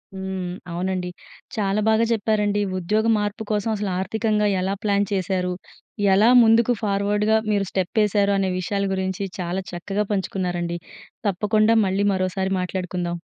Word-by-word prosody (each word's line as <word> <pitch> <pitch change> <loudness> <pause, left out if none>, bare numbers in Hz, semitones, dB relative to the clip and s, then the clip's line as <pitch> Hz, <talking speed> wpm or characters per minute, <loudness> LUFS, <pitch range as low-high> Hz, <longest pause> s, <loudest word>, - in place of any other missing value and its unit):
హ్మ్. 190 -2 -4 0.2
అవునండి. 180 +1 -2 0.5
చాలా 205 -1 0
బాగా 220 +1 +3
చెప్పారండి. 210 -1 +1 0.2
ఉద్యోగ 210 +5 0
మార్పు 210 +2 -2
కోసం 210 +1 0
అసలు 205 -1 -2
ఆర్థికంగా 210 +2 0
ఎలా 190 +1 -1
ప్లాన్ 200 -1 +2
చేశారు. 185 -1 -1 0.6
ఎలా 210 +4 +5
ముందుకు 230 +2 +4
ఫార్వర్డ్‌గా 210 +1 +1
మీరు 200 -1 +1
స్టెప్ 190 +3 0
ఎశారు 200 0 +2
అనే 195 -1 +1
విషయాల 200 +2 -1
గురించి 190 0 -2 0.2
చాలా 180 +1 -2
చక్కగా 195 +4 -2
పంచుకున్నారండి. 175 -3 -2 0.5
తప్పకుండా 215 +3 +2
మళ్ళీ 195 +2 0
మరోసారి 190 0 -1
మాట్లాడుకుందాం. 180 -1 -3
195 Hz, 130 wpm, -23 LUFS, 185-210 Hz, 0.6 s, ఎలా